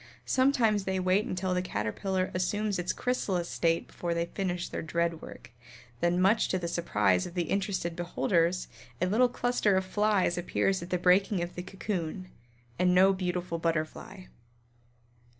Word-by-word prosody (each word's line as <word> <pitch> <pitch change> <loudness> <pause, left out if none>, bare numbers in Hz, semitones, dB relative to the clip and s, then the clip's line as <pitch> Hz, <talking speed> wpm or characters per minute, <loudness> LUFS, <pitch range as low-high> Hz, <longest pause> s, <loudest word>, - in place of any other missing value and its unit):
Sometimes 235 -7 +2
they 190 0 -1
wait 185 +3 +2
until 185 0 -2
the 180 - +1
Caterpillar 185 - -2
assumes 200 +2 -1
its 175 +1 -1
Chrysalis 195 -8 -1
state 165 -1 0
before 170 -1 -4
they 170 0 0
finish 180 -1 -3
their - - -5
dread 170 0 -1
work, - - -11 0.5
then 175 +1 +1
much 195 +5 +3
to 185 - 0
the 175 -2 -3
surprise 105 - +1
of 175 - -11
interested 185 0 -1
beholders, 175 0 0 0.3
a 180 - +2
little 230 +7 +3
cluster 245 -5 +1
of 190 - 0
flies 200 -2 +1
appears 190 +1 0
at 170 - -7
the 180 - +1
breaking 180 +1 +3
of 175 - -6
the 180 - -5
cocoon, 185 -2 -4 0.5
and 180 0 +3
no 190 +2 +6
beautiful 180 -2 -3
Butterfly. 165 +3 -3
180 Hz, 155 wpm, -29 LUFS, 170-195 Hz, 0.5 s, no